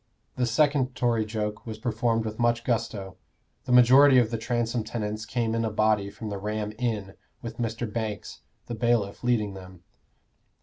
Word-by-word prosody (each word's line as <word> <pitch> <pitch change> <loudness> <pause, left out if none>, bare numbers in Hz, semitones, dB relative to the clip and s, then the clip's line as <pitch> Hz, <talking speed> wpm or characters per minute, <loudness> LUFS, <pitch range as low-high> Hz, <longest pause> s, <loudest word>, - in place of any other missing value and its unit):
The 125 -1 0
second 135 +1 +2
Tory 115 -3 +1
joke 105 0 -4
was 110 -1 -5
performed 115 0 0
with 110 +1 -5
much 120 -1 +2
gusto. 110 -6 -2 0.5
The - - -3
majority 130 +3 +7
of 120 -2 +3
the 115 - -1
Transome 120 -1 -1
tenants 110 -1 -4
came 115 -1 -1
in 115 0 0
a 110 - 0
body 105 -1 +1
from 110 +2 -7
the 100 -1 -4
Ram 105 +1 -3
Inn, 105 -6 -2 0.3
with 115 0 -7
Mr. 115 0 -2
Banks, 110 -1 -5 0.2
the 120 - -6
bailiff, 115 -3 0
leading 110 -5 +1
them. 90 -2 -12
115 Hz, 170 wpm, -26 LUFS, 105-120 Hz, 0.5 s, majority